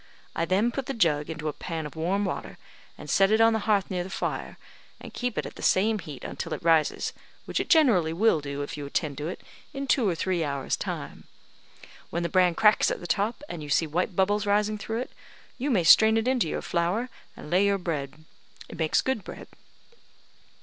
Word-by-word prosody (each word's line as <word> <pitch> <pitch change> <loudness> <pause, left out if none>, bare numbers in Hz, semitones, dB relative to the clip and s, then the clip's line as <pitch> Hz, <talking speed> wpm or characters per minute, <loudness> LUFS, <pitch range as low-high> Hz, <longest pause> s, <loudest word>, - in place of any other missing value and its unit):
I 165 - 0
then 200 +7 +2
put 265 +1 -4
the 275 - -3
jug 150 -8 +1
into 155 -1 -5
a 150 - -2
pan 165 0 -5
of 150 - -8
warm 185 +6 0
water, - - -5 0.4
and - - -10
set 195 0 +4
it 220 +1 +3
on 225 0 +5
the 220 - +1
hearth 200 -3 +2
near 180 -1 -1
the 185 - -8
fire, - - -4 0.4
and - - -11
keep 245 -2 -3
it - - -1
at - - -9
the - - -9
same 215 +3 +2
heat 150 -7 -9
until - - -5
it - - -11
rises, 160 -2 +2 0.3
which - - -2
it - - -3
generally 225 - +4
will 170 -2 +2
do, 140 0 -4
if 145 +3 -6
you 145 -1 -6
attend 140 -1 -2
to 150 - -3
it, 175 - -6 0.3
in 275 0 -3
two 250 -6 +2
or 175 - -1
three 175 0 -1
hours' 140 -2 -2
time. - - -6 0.8
When 170 - -2
the 170 - -1
bran 180 -1 +3
cracks 210 +2 +4
at - - -3
the - - -9
top, 215 - -1
and 170 - -6
you 150 - -8
see 155 +3 +2
white 175 +5 -2
bubbles 205 +2 +1
rising 210 +1 +1
through 225 +3 -3
it, - - -7 0.5
you 275 +4 -1
may 205 -10 +2
strain 220 +6 +7
it 225 +2 0
into 250 -10 +1
your - - -3
flour, 175 +8 0 0.3
and 150 - -10
lay 185 +3 +4
your 200 0 +2
bread. 155 -4 -5 0.4
It - - -10
makes 160 -1 +2
good 260 -6 -1
bread." - - -10
185 Hz, 220 wpm, -26 LUFS, 160-220 Hz, 0.8 s, strain